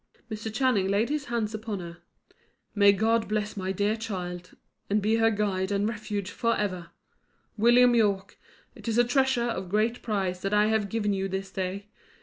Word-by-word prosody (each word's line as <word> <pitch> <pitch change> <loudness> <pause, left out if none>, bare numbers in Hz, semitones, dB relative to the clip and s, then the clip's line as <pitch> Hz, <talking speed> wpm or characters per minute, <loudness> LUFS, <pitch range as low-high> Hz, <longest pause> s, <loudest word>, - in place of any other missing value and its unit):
Mr. 220 +1 -4
Channing 220 -5 +2
laid 205 +5 +1
his 295 -1 -2
hands 230 -3 -2
upon 215 -2 -4
her. 170 -1 -8 0.8
"May 200 -1 +6
God 220 +3 +1
bless 210 0 -2
my 190 -1 -2
dear 205 +3 0
child, 180 -5 -6 0.3
and 205 +1 +2
be 215 +2 +1
her 225 0 +4
guide 200 -3 -1
and 200 +1 +1
refuge 205 -3 -4
for 230 -1 0
ever! 185 -5 -3 0.7
William 240 +2 +5
Yorke, 205 -4 +1 0.3
it - - -12
is 225 0 0
a 240 - +6
treasure 260 0 +2
of 190 -6 -3
great 215 +4 0
price 190 -5 -2
that 195 +1 0
I 210 +1 +4
have 220 -2 +1
given 210 -2 0
you 195 0 -1
this 190 0 -4
day. 190 +1 -4
210 Hz, 180 wpm, -27 LUFS, 195-225 Hz, 0.8 s, May